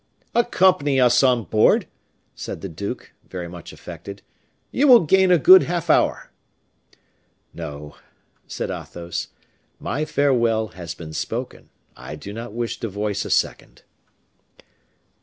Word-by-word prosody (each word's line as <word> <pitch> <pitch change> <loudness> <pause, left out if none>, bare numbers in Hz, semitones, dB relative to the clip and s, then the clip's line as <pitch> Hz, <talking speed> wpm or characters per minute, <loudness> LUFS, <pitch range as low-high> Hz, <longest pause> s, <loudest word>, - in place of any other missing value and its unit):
"Accompany 185 - +3
us 125 -1 +5
on 125 -3 +3
board," 110 +2 +3 0.5
said - - -7
the 95 - -5
duke, 95 +5 -6 0.2
very 90 -2 -6
much 85 -1 -10
affected; 100 0 -10 0.5
"you 285 +3 +2
will 245 -4 +8
gain 190 +4 +4
a 180 - +6
good 185 +5 +8
half 170 -2 0
hour." - - +1 1.2
"No," 75 -3 -8 0.5
said - - -4
Athos, 85 0 -6 0.5
"my 145 +5 -2
farewell 120 -7 +1
has 85 -4 -8
been 80 -2 -9
spoken, - - -5 0.3
I - - -9
do 100 +7 -9
not 115 +1 -7
wish 120 +1 -4
to 115 - -3
voice 105 0 -3
a - - -6
second." - - -1
115 Hz, 130 wpm, -22 LUFS, 95-150 Hz, 1.2 s, will